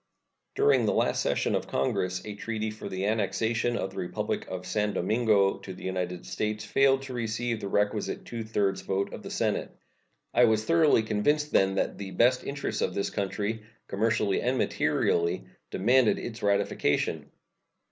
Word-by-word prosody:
During 425 +2 +4
the - - +2
last - - +1
session - - 0
of - - -1
Congress 95 -6 -1
a 105 - -5
treaty 110 +1 -3
for 110 - -8
the 95 +1 -3
annexation 110 +3 0
of 95 - -3
the - - -12
Republic 90 - -3
of - - -6
San 105 -1 0
Domingo 105 -1 +2
to 95 - -8
the - - -12
United 90 -1 -3
States 105 0 -3
failed 135 0 +3
to 135 -1 -7
receive 115 0 -2
the 100 - -3
requisite 105 +1 -1
two 115 -1 -5
thirds 105 -3 0
vote 95 +1 -2
of - - -7
the - - -8
Senate. - - -2 0.6
I 120 +1 +6
was 110 -1 +2
thoroughly 160 -8 +4
convinced 145 +8 +1
then 95 0 +3
that 95 - -1
the 100 -1 -5
best 125 +5 +3
interests 140 0 -3
of - - -1
this 100 - -1
country, 105 +2 -2 0.3
commercially 105 -1 +1
and 125 +2 0
materially, 85 - +1 0.2
demanded 120 +4 +3
its 115 0 -6
ratification. 100 -7 0
110 Hz, 165 wpm, -28 LUFS, 100-120 Hz, 0.6 s, I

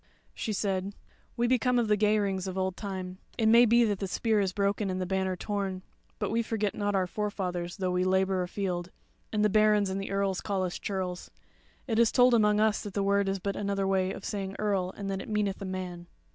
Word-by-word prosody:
She 220 - -3
said: 195 -1 -1 0.4
"We 240 - +2
be 250 +1 +3
come 250 +2 +2
of 235 -2 +2
the 210 - +4
Geirings 205 -2 +1
of 185 0 -4
old 190 -1 -1
time: 185 -2 -6 0.2
it 225 - +1
may 230 +2 +7
be 235 +1 +5
that 205 -4 0
the 195 - -2
spear 220 +3 +1
is 195 -2 +1
broken, 200 +1 0
and 185 0 -2
the 185 - -1
banner 190 0 -1
torn; 195 -1 -3 0.3
but - - -2
we 230 +1 +2
forget 220 -3 -1
not 205 -1 -1
our 190 -1 +2
forefathers, 180 -3 -3
though 185 -1 -1
we 180 0 +1
labour 190 0 +2
afield, 180 -1 -3 0.4
and 210 -1 +2
the - - +6
barons 210 -1 +3
and 195 +1 -2
the 195 - -5
earls 195 -1 0
call 195 -2 -1
us 180 -1 -3
churls. 185 -3 -4 0.6
It 225 -3 0
is 235 -1 +5
told 250 -1 +5
amongst 210 -2 +4
us 215 -1 +2
that 205 -3 -8
that 200 - +1
word 200 0 +2
is 195 - 0
but 200 +1 -3
another 200 -1 -1
way 190 -1 +1
of 195 - -7
saying 195 -1 -4
earl 195 -4 0
and 200 - -5
that 195 0 -3
it - - -9
meaneth 210 -2 -1
a - - -4
man." 180 -2 -5
195 Hz, 230 wpm, -29 LUFS, 185-210 Hz, 0.6 s, may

